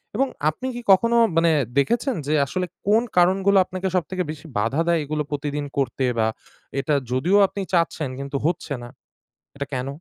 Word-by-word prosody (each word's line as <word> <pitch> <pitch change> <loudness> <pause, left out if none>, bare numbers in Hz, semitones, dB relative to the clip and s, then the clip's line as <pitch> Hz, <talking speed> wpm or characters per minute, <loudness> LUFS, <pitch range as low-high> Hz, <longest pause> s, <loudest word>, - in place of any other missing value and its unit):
এবং 270 +5 +2 0.2
আপনি 205 +12 -5
কি 240 - -5
কখনো 230 +5 +4 0.2
মানে 165 0 +4 0.3
দেখেছেন 235 - +1
যে 150 - +1
আসলে 180 +6 -2 0.2
কোন 220 +3 +4
কারণগুলো 190 +3 +4
আপনাকে 185 +1 -4
সবথেকে 180 +1 -1
বেশি 155 +1 -10
বাধা 115 +9 +1
দেয়? 170 -1 +3
এগুলো 150 +1 -2
প্রতিদিন 145 0 -3
করতে 135 -1 0
বা 110 -1 +2 0.5
এটা 145 +2 0 0.2
যদিও 155 +11 +2
আপনি 200 - -6
চাচ্ছেন 165 -4 +1
কিন্তু 140 0 -3
হচ্ছে 165 -3 -1
না। 120 - -9 0.7
এটা 140 0 -4
কেন? 130 0 -2
165 Hz, 170 wpm, -23 LUFS, 140-190 Hz, 0.7 s, কখনো